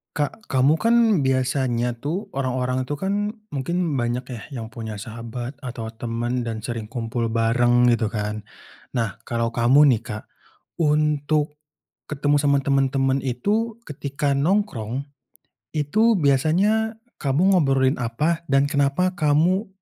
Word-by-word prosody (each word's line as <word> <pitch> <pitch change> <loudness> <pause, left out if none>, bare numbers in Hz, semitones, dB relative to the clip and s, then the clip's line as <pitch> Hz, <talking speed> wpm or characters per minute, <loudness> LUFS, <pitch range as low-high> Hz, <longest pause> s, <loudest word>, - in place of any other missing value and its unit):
Kak, 150 +9 -3
kamu 135 +4 +3
kan 230 +5 +3 0.3
biasanya 130 -2 0
tuh, 175 - -4
orang-orang 130 -1 -1
itu 145 - -3
kan 200 +7 -1 0.2
mungkin 155 +2 -1
banyak 120 0 -1
ya 120 -4 -6 0.2
yang 110 - -7
punya 110 -1 -6
sahabat 115 +4 -7
atau 120 -5 -6
teman 120 +2 -3
dan 115 -2 -4
sering 115 0 -4
kumpul 115 0 -3
bareng 120 +2 +3
gitu 115 -2 +1
kan. 105 0 -3 0.5
Nah 115 -5 -1
kalau 115 -1 -1
kamu 125 +6 +5
nih, 115 -5 +2
Kak, 110 -3 -7 0.5
untuk 150 -1 +1 0.5
ketemu 145 0 +1
sama 140 -1 +3
temen-temen 135 -1 +1
itu, 210 - -1
ketika 140 0 -2
nongkrong, 140 - 0 0.7
itu 215 +11 +3
biasanya 185 - +2 0.2
kamu 150 +8 +2
ngobrolin 135 -6 +3
apa 150 +8 0
dan 135 0 +3
kenapa 145 +5 +1
kamu 175 +5 +2
135 Hz, 125 wpm, -23 LUFS, 120-150 Hz, 0.7 s, kamu